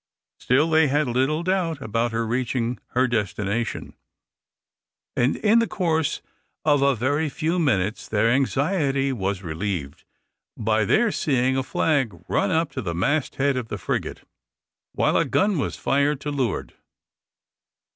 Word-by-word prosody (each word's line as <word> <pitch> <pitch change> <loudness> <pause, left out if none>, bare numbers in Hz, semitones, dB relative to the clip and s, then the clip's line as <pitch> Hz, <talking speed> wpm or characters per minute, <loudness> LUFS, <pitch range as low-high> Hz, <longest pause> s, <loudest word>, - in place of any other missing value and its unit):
Still, 140 +5 +2
they 160 -1 +4
had 145 +1 +1
little 135 +7 0
doubt 180 -4 0
about 115 -1 -1
her 115 0 -1
reaching 120 +1 -1 0.2
her 130 +1 +4
destination, 105 -1 -2 1.2
and 125 +3 +2
in 220 +2 +3
the 230 - +1
course 160 -4 -1 0.4
of 145 -2 +4
a 140 -1 +3
very 145 +7 0
few 165 +4 -1
minutes 110 - 0
their 110 +1 +1
anxiety 135 +2 +1
was 100 -4 -2
relieved 80 -3 -4 0.5
by 110 0 +1
their 220 - +3
seeing 130 -5 +1
a 135 - +1
flag 130 - 0
run - - +1
up 160 -1 +1
to 130 - -4
the 85 -6 -3
mast 140 - 0
head 140 0 +1
of 125 -3 -3
the 105 - -5
frigate, 90 - -4 0.7
while - - +1
a - - +4
gun 200 -4 +1
was - - -2
fired 140 +1 +1
to 145 - -3
leeward. 130 -7 -2
135 Hz, 145 wpm, -24 LUFS, 115-155 Hz, 1.2 s, they